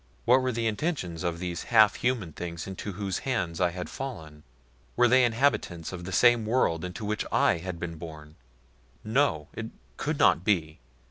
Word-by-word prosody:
What 125 +2 +5
were 130 0 0
the 115 -1 -2
intentions 110 - -2
of 85 -2 -2
these 85 -1 -4
half 110 -3 +5
human 120 -10 -1
things 85 0 -6
into 95 +1 -6
whose 95 -1 -3
hands 105 -11 -2
I 90 - +4
had 90 +1 -6
fallen? 80 - -7 0.5
Were 120 0 +5
they 130 +2 +5
inhabitants 115 - 0
of 90 -1 -7
the 95 - -5
same 120 +3 +5
world 105 -8 +1
into 90 +4 -5
which 105 +1 -1
I - - +3
had 90 0 -6
been 85 -1 -5
born? 75 -2 -10 0.7
No! 110 - +1
It - - -5 0.3
could - - -2
not 85 - +4
be. 85 -7 0
95 Hz, 180 wpm, -28 LUFS, 85-120 Hz, 0.7 s, What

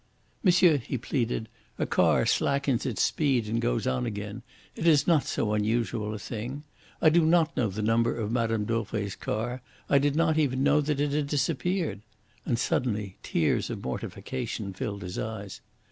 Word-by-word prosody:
"Monsieur," 180 -5 +5
he 130 0 -4
pleaded, 120 -2 -2 0.3
"a - - 0
car - - +3
slackens 140 -3 +1
its 120 - 0
speed 135 -8 +1
and 115 +2 -1
goes - - 0
on 65 -1 0
again 105 +3 -5 0.3
it 170 - -1
is 150 -4 +5
not 165 -5 +3
so 105 -2 -1
unusual 110 0 0
a - - -4
thing. 120 +7 -6 0.4
I 160 - +8
did 170 +2 +4
not 165 0 +3
know 120 - +1
the 105 +3 -4
number 115 +2 +2
of 110 -2 -2
Mme. 115 -2 +1
Dauvray's 105 -3 -2
car. 120 +4 -3 0.3
I 140 - +4
did 145 +1 +1
not 160 -1 +2
even 135 -3 +1
know 145 +1 +4
that 145 -1 -1
it 145 0 +1
had 145 0 0
disappeared"; 145 - -1 0.5
and 120 - +1
suddenly 105 -5 -1
tears 80 - 0
of - - -5
mortification 95 +9 -4
filled 100 +1 -4
his 90 0 -5
eyes. 110 -3 -5
120 Hz, 175 wpm, -28 LUFS, 105-145 Hz, 0.5 s, I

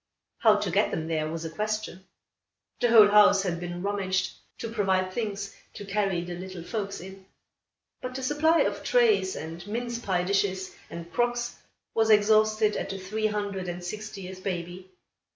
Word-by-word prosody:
How - - +6
to - - -1
get - - +3
them 160 0 -3
there, 155 -2 -1
was 165 +1 -5
a - - -3
question. 215 -1 -3 0.7
The 245 - +2
whole 220 -3 +9
house 205 -1 +6
had 175 -3 -2
been 175 0 -5
rummaged 195 -2 0 0.3
to 230 - -5
provide 190 -4 +1
things 200 -3 -3 0.2
to 205 - -7
carry 195 -3 0
the 175 0 -6
little 185 0 -7
folks 200 0 -4
in: 190 +1 -11 0.7
but 255 0 -5
the 265 - -4
supply 300 +5 +3
of - - -1
trays, 435 -6 +3
and 165 +4 -7
mince 235 +2 -3
pie 185 -6 0
dishes, 190 0 0 0.2
and 170 0 -8
crocks, 240 +1 0 0.4
was 225 -1 +2
exhausted 215 0 +4
at - - -3
the 195 - -4
three 215 +3 -1
hundred 200 -3 -3
and 175 0 -5
sixtieth 190 -1 -7
baby. 180 0 -4
200 Hz, 170 wpm, -27 LUFS, 185-215 Hz, 0.7 s, whole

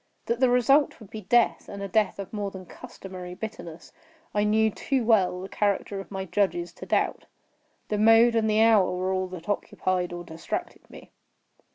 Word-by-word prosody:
That 235 0 -1
the 260 -1 +4
result 270 +4 +3
would 215 -3 -14
be 220 - -7
death, 235 +5 +2
and 200 0 -7
a - - -3
death 210 +2 +1
of 195 +1 -8
more 205 -2 -2
than 190 -1 -10
customary 185 -5 -10
bitterness, 175 -6 -8 0.4
I 205 - +1
knew 220 +1 +3
too 260 +3 -1
well 195 -5 +3
the 190 - -6
character 200 0 -1
of 195 - -9
my 190 -1 -5
judges 175 -3 -1
to - - -11
doubt. - - 0 0.6
The 210 - -1
mode 225 +2 +6
and 220 -1 +1
the 215 +1 +4
hour 215 -5 +4
were 185 +1 -1
all 185 0 -1
that 180 -1 -10
occupied 185 -3 -1
or 175 0 -6
distracted 165 -1 -6
me. - - -14
200 Hz, 190 wpm, -26 LUFS, 185-220 Hz, 0.6 s, mode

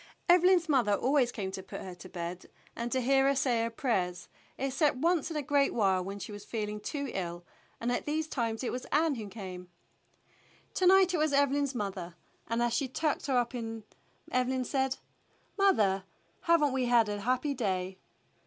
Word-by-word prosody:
Evelyn's 355 0 +5
mother 250 -9 +3
always 260 +2 +2
came 195 -5 -4
to 190 - -6
put - - -8
her 185 - -7
to 175 +1 -12
bed 175 0 -5
£0 - - -25
THE - - -16
BLUE - - -34
AUNT - - -29
and 235 +1 -3
to 260 - +1
hear 270 +2 +3
her 275 - +3
say 250 -3 +1
her 230 - 0
prayers, 185 -8 -2 0.3
except 275 +1 +1
once 335 +2 +1
in 320 - -3
a 295 - -2
great 280 0 +2
while 190 -5 +2
when 195 +2 -5
she 205 - -7
was 205 -1 -8
feeHng 210 -1 -4
too 280 +2 -4
ill, 175 -2 -4 0.4
and 235 +1 -1
at 245 - -2
these 310 +1 -1
times 230 -5 -2
it 245 - -1
was 250 - -5
Ann 310 +1 +2
who 220 -5 -5
came. 185 -4 -8 1.0
To 370 - +2
night 380 -1 +6
it 340 - +1
was 305 -1 +1
Evelyn's 280 -1 +2
mother, 190 -5 -4 0.3
and 230 +1 0
as 240 -1 +1
she 265 +3 0
tucked 300 +4 -1
her 265 -2 +2
up 240 +1 0 0.8
Evelyn 255 0 0
said, 265 -1 0 0.6
"Mother, 210 - +3 0.4
have 335 -2 +4
n't 285 -3 +2
we 260 -1 +1
had 240 -2 +4
a 205 0 -3
happy 255 +6 0
day?" 190 -6 -2
245 Hz, 205 wpm, -30 LUFS, 205-285 Hz, 1.0 s, night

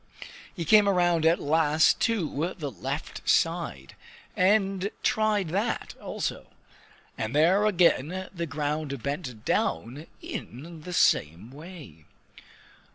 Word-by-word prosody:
He 170 -4 -4
came 210 +3 +6
around 175 -4 +2
at 165 +2 +3
last 155 +1 +3
to 175 -6 -1
the 145 -5 -4
left 95 - -5
side, 65 0 0 0.4
and 195 0 +2
tried 215 -5 +1
that 200 +7 -2
also. - - -4 0.7
And 110 +4 -3
there 185 +7 +4
again 180 -1 +2
the 170 -2 -4
ground 145 -2 -3
bent 140 -6 -5
down 120 - -1
in 155 +7 -8
the 180 +3 -7
same 85 - +1
way. 145 - -12
160 Hz, 110 wpm, -27 LUFS, 140-185 Hz, 0.7 s, came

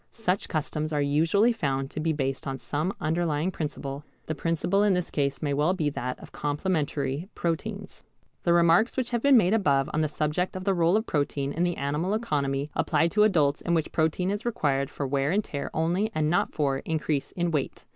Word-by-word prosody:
Such 200 -4 -1
customs 155 -1 -2
are 150 - 0
usually 165 +11 +3
found 135 -10 -2
to - - -5
be 160 +1 +1
based 135 -3 -2
on 135 0 -3
some 150 +7 -2
underlying 160 +1 0
principle. 145 -4 -5 0.2
The 160 - -2
principle 165 +5 0
in 205 -2 +4
this 180 -1 -2
case 140 -1 -1
may 145 -2 0
well 150 +6 +2
be 150 -5 0
that 125 -2 -4
of - - -12
complementary 145 0 -2
proteins. 165 -2 -3 0.4
The 170 - +1
remarks 170 +8 +4
which 250 -2 -1
have 235 -1 0
been 280 -1 +6
made 195 -3 +4
above 145 -9 +2
on 155 - +1
the 155 - +2
subject 155 +5 -1
of 185 - -4
the 195 0 +2
rôle 175 +2 +3
of 220 - -1
protein 145 -4 -1
in 165 - -3
the 175 -1 -1
animal 150 +8 -1
economy 145 -9 -1
apply 160 +1 +2
to 210 +4 +2
adults 155 -9 +3
in 170 - 0
which 160 -2 -1
protein 160 +4 +1
is 205 +2 -3
required 140 - 0
for 145 - -4
wear 135 +1 0
and 205 +5 +1
tear 140 -6 -5
only 175 +7 0
and 155 0 +1
not 175 - +1
for 140 -3 0
increase 155 -2 -2
in 175 -1 -1
weight. 150 -4 -3
155 Hz, 205 wpm, -27 LUFS, 145-180 Hz, 0.4 s, been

